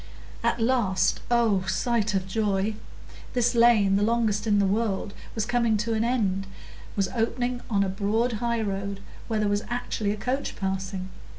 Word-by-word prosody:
At - - +1
last—oh, 225 -1 +2
sight 215 +1 +1
of 190 -1 -1
joy!—this 215 +4 -2
lane, 225 -5 +5
the - - +1
longest 220 -1 +1
in 205 -1 +4
the 200 - +3
world, 200 0 0 0.2
was 220 -2 0
coming 235 -2 +2
to 220 +2 -1
an 220 0 +1
end, 200 -6 0 0.5
was 195 -2 +1
opening 245 +1 -1
on 200 -3 +2
a - - 0
broad 210 +5 0
highroad, 200 -4 -1 0.3
where 220 -2 0
there 210 - +1
was 205 0 +1
actually 240 -3 -2
a 210 - -1
coach 255 +6 -2
passing! 190 -1 -3
215 Hz, 155 wpm, -26 LUFS, 195-235 Hz, 0.5 s, lane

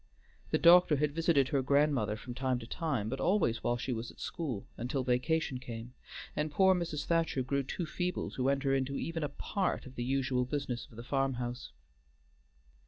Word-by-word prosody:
The - - +2
doctor 170 -2 +7
had 145 0 0
visited 160 -4 +3
her 140 -3 +2
grandmother 140 -6 +2
from 120 +3 -8
time 130 0 0
to 120 - -7
time, 135 -5 -2
but 135 +4 -3
always 165 - +2
while 120 - +1
she 125 +1 -2
was 115 0 -4
at - - -15
school, 130 -12 -4
until 130 +3 -2
vacation 130 +2 0
came, 120 -1 -8 0.4
and 150 0 -1
poor 190 +4 +5
Mrs. 165 -5 -2
Thacher 165 -5 +1
grew 140 +2 0
too 140 +6 -4
feeble 180 +2 -2
to 130 +1 0
enter 135 0 +1
into 135 0 0
even 165 0 -3
a 145 - -1
part 190 +6 -2
of 130 - -10
the 120 - -4
usual 130 0 +1
business 130 -2 -3
of - - -16
the 115 - -7
farmhouse. 125 -2 -2
135 Hz, 185 wpm, -32 LUFS, 125-155 Hz, 0.4 s, doctor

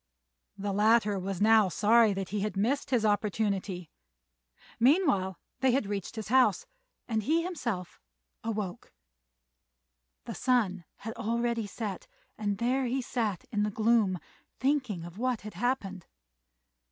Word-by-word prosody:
The 200 0 -2
latter 210 -1 +3
was 190 0 -4
now 220 -3 +6
sorry 220 +3 +4
that 195 -1 -4
he 210 - -2
had 200 -1 -2
missed 255 +10 0
his 240 -4 +2
opportunity; 200 -4 -1 0.9
meanwhile 240 - +3 0.2
they 260 -1 +3
reached 205 -4 -4
his 215 -2 -5
house, 260 - +4 0.4
and 220 -2 0
he 320 +9 +1
himself 240 - -4 0.4
awoke. 210 -5 -4 1.3
The - - -5
sun 210 -9 +1
had 225 +1 -7
already 235 -1 -1
set, 205 -1 -5 0.3
and 205 -2 -2
there 255 +4 +1
he 260 +2 -1
sat 220 -8 -2
in 210 - 0
the 210 - +1
gloom 215 -3 +2 0.4
thinking 260 - 0
of 175 +4 -10
what 250 -2 0
had 210 -1 -8
happened. 195 -4 -2
215 Hz, 130 wpm, -29 LUFS, 195-240 Hz, 1.3 s, now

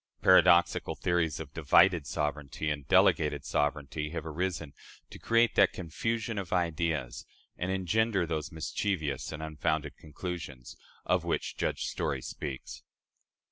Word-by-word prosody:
Paradoxical 85 -1 +5
theories 85 -3 0
of 75 -4 -8
"divided 80 +1 +4
sovereignty" 75 0 -2
and 70 -2 -5
"delegated - - +3
sovereignty" 75 +1 -1
have 80 -1 -5
arisen, 80 -2 -3 0.4
to - - -10
create 115 0 +3
that 100 - +4
"confusion 110 +5 -3
of 95 -4 -6
ideas" 85 -7 -1 0.3
and 90 +2 -3
engender 95 +1 +1
those 80 -2 -3
"mischievous 80 -3 -2
and 80 0 -6
unfounded 75 -2 -2
conclusions," 75 -5 -7 0.3
of - - +2
which - - -2
Judge - - -2
Story 65 -2 -2
speaks. 70 -3 -6
80 Hz, 125 wpm, -30 LUFS, 75-90 Hz, 0.4 s, Paradoxical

